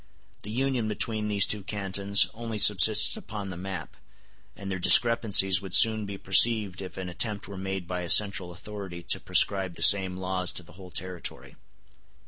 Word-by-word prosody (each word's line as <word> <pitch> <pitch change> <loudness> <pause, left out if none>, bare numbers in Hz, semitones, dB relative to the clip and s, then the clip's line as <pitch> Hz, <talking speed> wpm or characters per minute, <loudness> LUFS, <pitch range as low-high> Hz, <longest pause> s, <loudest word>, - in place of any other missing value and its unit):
The 105 - -10
union 125 0 -4
between 110 0 -1
these 100 -1 0
two 105 - -5
cantons 100 0 -2
only 115 -1 -8
subsists 105 +1 +4
upon 100 -2 -10
the - - -10
map, 90 -2 -10 0.6
and 100 -1 -10
their 95 - -6
discrepancies 105 -3 +4
would 95 -2 -2
soon 110 -2 +4
be 100 0 -9
perceived 100 0 +1
if 95 - -12
an 95 -1 -8
attempt 105 +4 -4
were 100 - -11
made 95 -1 -8
by 90 0 -6
a 85 - -8
central 95 -4 +3
authority 95 -1 -11
to - - 0
prescribe 95 -3 +1
the 80 - -1
same 95 +2 +4
laws 95 -1 -4
to 90 - -9
the 85 - -20
whole 90 +1 -15
territory. 90 +1 -8
95 Hz, 175 wpm, -24 LUFS, 90-105 Hz, 0.6 s, subsists